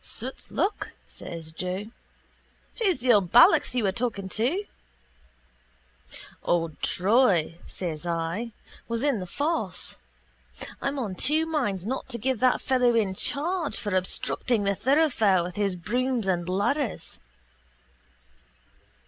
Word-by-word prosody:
—Soot's 255 +4 -4
luck, 390 +7 -1 0.2
says 165 -2 -8
Joe. 185 +6 -4 0.9
Who's 395 -6 +2
the 245 0 +3
old 195 -5 +2
ballocks 245 +1 +6
you 245 - +1
were 195 - +2
talking 220 -4 -3
to? 280 - 0 1.8
—Old 165 -3 -1
Troy, 185 -5 +2
says 165 -4 -5
I, 170 +7 -2 0.4
was 230 +1 -2
in 280 -7 +2
the 180 - -6
force. 305 - -2 0.8
I'm 275 +1 -2
on 225 -8 -2
two 300 - +2
minds 245 - -1
not 260 +4 -3
to 240 - -4
give 255 +1 -1
that 255 -1 +3
fellow 250 -3 +2
in 205 -4 +2
charge 310 - -1
for 205 -3 -3
obstructing 205 +4 0
the 200 0 +2
thoroughfare 230 - +3
with 175 0 -6
his 200 -3 0
brooms 240 +4 -1
and 175 -2 0
ladders. 210 +7 -1
225 Hz, 125 wpm, -26 LUFS, 185-265 Hz, 1.8 s, ballocks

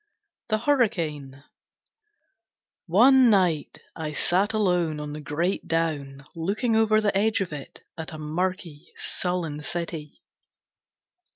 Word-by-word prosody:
The 215 - +2
Hurricane 165 - 0 1.4
One 250 +8 +6
night 180 -8 +2 0.2
I 155 -2 -4
sat 190 +7 +2
alone 180 -7 +1
on 150 0 -5
the 150 - -6
great 170 +6 -2
down, 145 -4 -2
looking 210 +8 0
over 220 -1 +4
the 210 -2 0
edge 215 +3 +2
of 185 -5 -3
it 140 -2 -9 0.2
at 160 - -5
a - - -6
murky, 165 0 -3
sullen 175 -5 -2
city. 160 -2 -5
170 Hz, 115 wpm, -25 LUFS, 150-205 Hz, 1.4 s, One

